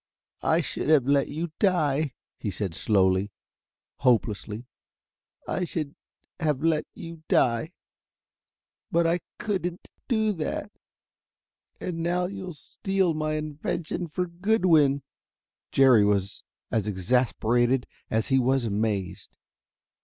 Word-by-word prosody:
"I - - +3
should - - -3
have 150 -5 +5
let 140 0 +3
you 160 +2 -4
die," 155 -7 +2 0.2
he 105 - -2
said 95 -2 -3
slowly, 95 +1 +2 0.7
hopelessly. 110 -2 +1 0.8
"I 185 - -1
should 155 -4 -3 0.4
have 150 -4 0
let 160 -2 +2
you 165 -1 -9
die. 120 +8 +2 1.2
But 170 0 +3
I 170 +2 +2 0.2
couldn't 180 -4 -3 0.2
do 220 -4 +2
that.... 185 +4 -3 1.1
And 170 -2 -4
now 175 +2 +1
you'll 185 -2 -6
steal 190 +4 -1
my 155 0 -1
invention 155 +3 -3
for 180 +4 -2
Goodwin." 170 -7 +3 0.7
Jerry 130 -6 +6
was 100 -1 +1 0.3
as 110 -2 0
exasperated 120 +4 +2 0.2
as 110 0 0
he 135 -1 +4
was 130 0 +2
amazed. 100 -3 -2
150 Hz, 110 wpm, -26 LUFS, 115-170 Hz, 1.2 s, Jerry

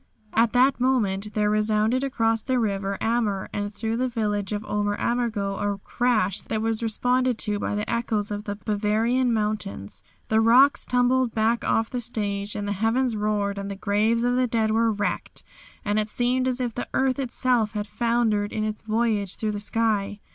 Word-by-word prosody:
At 230 0 +3
that 255 +2 +4
moment 210 -6 0
there 210 -1 +2
resounded 215 +4 +1
across 225 -4 +1
the 260 +3 0
river 200 -3 -1
Ammer 220 -4 0
and 205 0 -2
through 225 +2 -3
the 255 +1 +1
village 210 -4 -2
of 210 0 -3
Ober 205 0 -1
Ammergau 220 -5 -1
a 205 -1 -1
crash 215 -2 0
that 220 - -3
was 225 0 -1
responded 250 +2 +1
to 210 -2 -1
by 205 - -2
the 210 +1 -2
echoes 220 -3 -1
of 205 +1 -4
the 205 - -3
Bavarian 225 +4 +1
mountains. 205 - -3 0.3
The 220 0 +3
rocks 255 +5 +5
tumbled 250 -1 +2
back 225 +2 +1
off 225 0 +1
the 250 - -2
stage, 205 -3 -3
and 205 -1 -3
the - - -1
heavens 235 +2 +1
roared 205 -1 -1
and 200 0 -5
the 200 - -4
graves 215 +4 +1
of 245 0 +2
the 255 0 +2
dead 220 -2 +1
were 225 +1 +3
wrecked, 205 -1 -3 0.4
and 205 +1 +1
it 215 0 -2
seemed 250 +3 0
as 255 0 -1
if 245 -2 -2
the 245 - -5
earth 265 0 +1
itself 245 -4 0
had 210 -1 -2
foundered 225 -3 0
in 215 - -2
its 215 0 -3
voyage 215 -3 0
through 215 -1 -2
the 205 - -4
sky. 210 -1 -1
220 Hz, 190 wpm, -25 LUFS, 205-240 Hz, 0.4 s, rocks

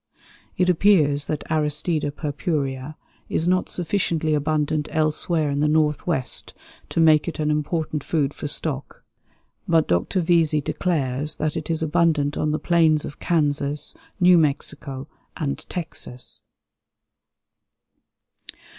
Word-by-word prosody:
It 180 - +2
appears 160 -6 +3
that 155 -2 -2
Aristida 150 0 0
purpurea 145 -2 -3 0.3
is 165 - -1
not 185 0 +1
sufficiently 165 -3 0
abundant 150 0 0
elsewhere 155 0 +1
in 140 - -1
the 150 - +2
Northwest 150 -2 0 0.3
to - - -2
make 155 -1 +5
it 170 - -4
an 150 -1 0
important 150 0 -1
food 145 -4 0
for - - -5
stock; 145 -1 -3 0.6
but 165 -2 +3
Dr. 90 - +1
Vesey 165 -3 +3
declares 145 -2 -1
that 155 +1 -1
it 160 -1 -4
is 160 -1 0
"abundant 155 -2 +2
on 155 - 0
the 150 - 0
plains 160 -3 +3
of 145 - -9
Kansas, 145 -3 0 0.3
New 180 -1 +6
Mexico, 140 -2 -2 0.3
and 145 -5 -4
Texas." 155 -7 -4
155 Hz, 120 wpm, -23 LUFS, 145-165 Hz, 0.6 s, New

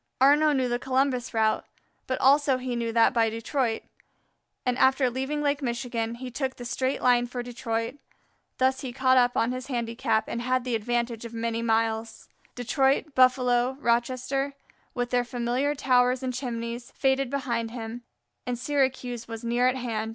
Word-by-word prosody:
Arnaux 295 +3 +5
knew 260 -2 +1
the 240 0 -1
Columbus 260 -1 0
route, 220 -1 +1 0.4
but 260 - -1
also 275 0 +4
he 255 -1 -3
knew 230 -1 -1
that 230 +1 +4
by 230 -2 +3
Detroit, 230 +1 -1 0.8
and 250 -1 +1
after 265 -1 +4
leaving 265 +4 -2
Lake 285 0 +1
Michigan, 235 -2 -2
he 250 +1 -7
took 260 +1 -3
the 245 - -9
straight 260 +2 -1
line 245 -1 +4
for 245 0 -5
Detroit. 235 0 -3 0.6
Thus 260 0 +2
he 255 -3 -5
caught 260 0 +3
up 245 0 +2
on 230 - +2
his 255 0 -5
handicap 230 -3 -1
and 235 - -3
had 255 +1 0
the 250 -1 -3
advantage 235 +1 -1
of 235 0 -8
many 230 0 -2
miles. 225 0 -1 0.3
Detroit, 270 +4 +1
Buffalo, 255 -1 +3
Rochester, 255 +3 0 0.4
with 245 -1 -2
their 245 -1 +2
familiar 245 +4 -1
towers 250 -1 +2
and 255 -1 -2
chimneys, 235 -1 -4
faded 270 -1 +1
behind 240 -4 -2
him, 230 0 -6 0.5
and 245 -1 -1
Syracuse 255 -3 -1
was 225 0 -7
near 240 +2 +2
at 255 - +2
hand. 225 -4 -3
245 Hz, 165 wpm, -26 LUFS, 235-260 Hz, 0.8 s, Arnaux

